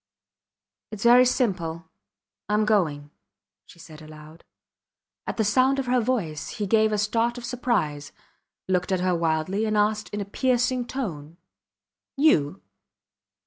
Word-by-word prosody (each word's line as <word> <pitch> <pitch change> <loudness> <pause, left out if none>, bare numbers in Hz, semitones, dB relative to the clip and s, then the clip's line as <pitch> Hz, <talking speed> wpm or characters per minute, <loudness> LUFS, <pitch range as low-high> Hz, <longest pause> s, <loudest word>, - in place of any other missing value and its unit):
Its 215 -2 -7
very 245 +2 +7
simple 170 -10 -1 0.6
Im 210 +1 +2
going, 155 -9 0 0.6
she - - -17
said 160 -2 -13
aloud. 155 +1 -13 0.8
At - - -4
the 220 - +2
sound 255 +6 +3
of 270 - -2
her 250 0 +2
voice 210 -11 -2
he 210 - -2
gave 220 +2 +3
a 210 - 0
start 230 +3 0
of 240 - -7
surprise, 195 - -2 0.6
looked 180 0 0
at 185 -1 0
her 185 0 +1
wildly, 165 +4 -1
and 215 -1 0
asked 210 0 0
in 210 - -5
a 200 - -3
piercing 245 +2 0
tone 170 - -6 0.8
You. 195 - +2
210 Hz, 140 wpm, -25 LUFS, 165-240 Hz, 0.8 s, very